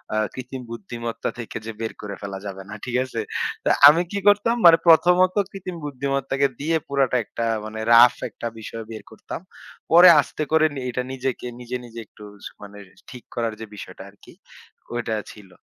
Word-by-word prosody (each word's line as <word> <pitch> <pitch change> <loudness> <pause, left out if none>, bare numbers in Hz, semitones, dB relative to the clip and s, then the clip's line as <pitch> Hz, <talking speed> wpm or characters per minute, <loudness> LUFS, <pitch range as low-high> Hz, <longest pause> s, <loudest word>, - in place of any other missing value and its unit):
আ - - +1 0.2
কৃত্রিম 130 0 -7
বুদ্ধিমত্তা 115 +1 -5
থেকে 115 - -6
যে 115 - -5
বের 115 - -3
করে 100 -1 -6
ফেলা 100 -1 -6
যাবে 95 -1 -6
না। - - -7
ঠিক 125 - -4
আছে? 130 -3 -6 0.4
তো - - +1 0.2
আমি 155 +4 +6
কি 200 - -2
করতাম? 205 +3 +4
মানে 165 -1 +9
প্রথমত 180 +3 +5 0.2
কৃত্রিম 185 -2 -7
বুদ্ধিমত্তাকে 140 0 -1
দিয়ে 160 +3 +1
পুরাটা 135 -3 +1
একটা 115 - -4 0.2
মানে 110 0 -7
রাফ 120 +1 +8 0.2
একটা 120 - -6
বিষয় 115 +1 -7
বের 110 - -8
করতাম। 110 - -8 0.5
পরে 175 +2 +9
আস্তে 155 - -5
করে 160 0 +4 0.2
এটা 125 +1 -3
নিজেকে 130 -1 -4
নিজে, 125 0 -6
নিজে 115 -1 -10
একটু 105 - -16 0.4
মানে 105 0 -11 0.3
ঠিক 125 -2 -11
করার 115 -2 -1
যে 110 - -6
বিষয়টা 95 -2 -10
আরকি 100 - -18 0.6
ওইটা 115 -2 -2 0.2
ছিল। 105 -3 -15
125 Hz, 175 wpm, -23 LUFS, 110-150 Hz, 0.6 s, মানে